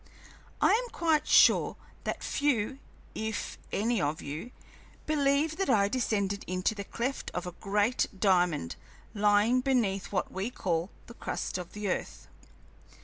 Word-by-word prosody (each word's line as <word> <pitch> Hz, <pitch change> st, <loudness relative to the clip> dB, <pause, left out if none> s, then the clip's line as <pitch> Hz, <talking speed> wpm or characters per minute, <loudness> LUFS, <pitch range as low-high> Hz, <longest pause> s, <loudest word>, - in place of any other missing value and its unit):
I -, -, +5 dB
am 485 Hz, +2 st, +2 dB
quite 315 Hz, -3 st, +1 dB
sure -, -, +6 dB, 0.3 s
that -, -, -3 dB
few, 270 Hz, -2 st, 0 dB, 0.3 s
if 220 Hz, -1 st, -4 dB
any 225 Hz, 0 st, +1 dB
of 150 Hz, +1 st, -1 dB
you, 150 Hz, +11 st, -6 dB, 0.6 s
believe 295 Hz, +1 st, +2 dB
that 390 Hz, -6 st, 0 dB
I 200 Hz, -5 st, +4 dB
descended 200 Hz, -5 st, 0 dB
into 185 Hz, +3 st, 0 dB
the 200 Hz, -2 st, -5 dB
cleft 250 Hz, +7 st, -3 dB
of 175 Hz, -, -2 dB
a 180 Hz, -, -4 dB
great 205 Hz, +6 st, +1 dB
diamond 175 Hz, -, +2 dB, 0.4 s
lying 210 Hz, +4 st, +3 dB
beneath 230 Hz, -8 st, 0 dB
what 195 Hz, -, -1 dB
we 195 Hz, +4 st, -2 dB
call 175 Hz, -6 st, -1 dB, 0.2 s
the 235 Hz, -, -11 dB
crust 185 Hz, -, -4 dB
of 180 Hz, -1 st, -8 dB
the 210 Hz, 0 st, -4 dB
earth. -, -, -3 dB
210 Hz, 145 wpm, -30 LUFS, 190-255 Hz, 0.6 s, sure